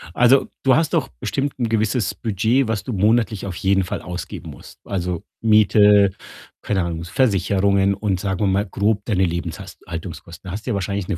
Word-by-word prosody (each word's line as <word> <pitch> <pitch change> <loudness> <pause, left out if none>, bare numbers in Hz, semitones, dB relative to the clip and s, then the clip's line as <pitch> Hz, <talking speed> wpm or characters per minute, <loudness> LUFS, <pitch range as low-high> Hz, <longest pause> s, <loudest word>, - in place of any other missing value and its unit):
Also, 125 +3 +4 0.2
du 135 -2 +5
hast 155 +1 +1
doch - - +1
bestimmt 140 0 -2
'n 120 -2 0
gewisses 110 -2 0
Budget, 115 +4 +1
was 110 -4 -2
du - - -5
monatlich 105 0 +1
auf 95 -3 -5
jeden 95 +1 +1
Fall 90 - -4
ausgeben 90 0 -7
musst. - - -14
Also, 90 -3 -3 0.2
Miete, 105 -2 +5 0.5
keine 95 -3 0
Ahnung, 85 -1 -3
S 85 - -8
Versicherungen 100 -4 +2
und 100 -2 -1
sagen 95 0 -2
wir 105 - +2
mal 95 +2 +1
grob 105 +2 -1
deine 95 -4 +1
Lebenshast 85 -1 -5
Haltungskosten. 85 +1 -8
Hast 105 +6 -7
ja 120 - 0
wahrscheinlich 100 -1 -2
'ne 95 - -2
100 Hz, 185 wpm, -21 LUFS, 95-110 Hz, 0.5 s, du